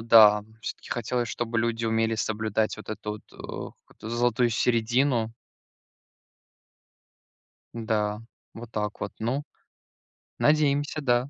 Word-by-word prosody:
э, - - -6
да, 105 -2 +8 0.2
всё-таки - - -7
хотелось, 120 +1 -1
чтобы 115 -1 -2
люди 115 0 0
умели 115 0 +2
соблюдать 110 0 0
вот 110 - -11
эту 105 -1 -4
вот, 105 - -8
э, - - -16 0.5
какую-то 110 - -10
золотую 120 0 +2
середину. 120 +1 +2 2.4
Да, 105 -2 -1 0.3
вот 115 0 -9
так 105 -1 -3
вот. 105 - -2
Ну, 125 +6 -1 0.9
надеемся, 150 0 +2
да. 125 -1 +2
115 Hz, 115 wpm, -27 LUFS, 110-120 Hz, 2.4 s, да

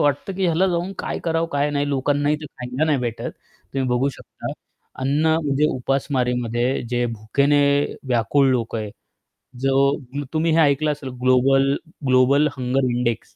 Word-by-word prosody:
वाटतं 145 +6 0
की 190 0 -1
ह्याला 175 +2 +2
जाऊन 175 +2 -1
काय - - -3
करावं, 165 0 0
काय 145 +1 +1
नाही. 145 0 -1
लोकांनाही 145 +2 +1
ते 150 - -7
खायला 125 +3 -3
नाही 150 -4 +2
भेटत. 120 -2 -3 0.4
तुम्ही 130 -2 0
बघू 125 +3 +1
शकता. - - -8 0.5
अन्न 145 +4 +1 0.2
म्हणजे 145 +1 +2
उपासमारीमध्ये 125 -2 -1
जे 120 0 +1
भुकेने 140 +6 +1 0.5
व्याकुळ 125 +4 +2
लोकं 115 -3 -1
आहे, 105 -1 -5 0.7
जो 135 +1 +2 0.4
तुम्ही 160 +1 +1
हे 165 - +3
ऐकलं 150 0 +3
असेल 140 -2 -6
ग्लोबल, 135 +2 +4 0.3
ग्लोबल 130 +4 +4
हंगर 130 +1 0
इंडेक्स 120 -2 -2
135 Hz, 150 wpm, -22 LUFS, 125-145 Hz, 0.7 s, ग्लोबल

